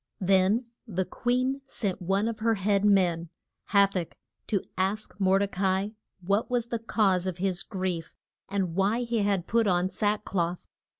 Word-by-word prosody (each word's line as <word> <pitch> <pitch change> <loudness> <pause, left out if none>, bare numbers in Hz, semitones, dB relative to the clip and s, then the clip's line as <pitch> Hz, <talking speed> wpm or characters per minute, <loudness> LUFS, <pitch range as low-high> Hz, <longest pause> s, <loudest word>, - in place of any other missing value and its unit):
Then 195 +4 +3 0.2
the 190 -3 -1
queen 255 +5 0
sent 200 -7 -3
one 195 +4 +1
of 230 -1 -3
her 225 +1 +2
head 200 0 +1
men, 180 -5 +3 0.4
Ha 200 -1 +5
tach, 185 -4 -4 0.3
to 200 -3 0
ask 200 +3 -1
Mor 190 0 +4
de 200 +1 +1
ca 195 0 -3
i 200 +2 -3 0.3
what 200 +5 0
was 240 -1 -1
the 235 - -2
cause 195 -5 +1
of 185 -2 -3
his 185 0 0
grief, 185 -5 -4 0.3
and 190 -3 -1
why 200 +6 +1
he 235 -1 -1
had 200 -4 +1
put 230 +1 +2
on 180 0 +2
sack 210 0 0
cloth. 175 -2 -2
195 Hz, 175 wpm, -28 LUFS, 185-215 Hz, 0.4 s, Ha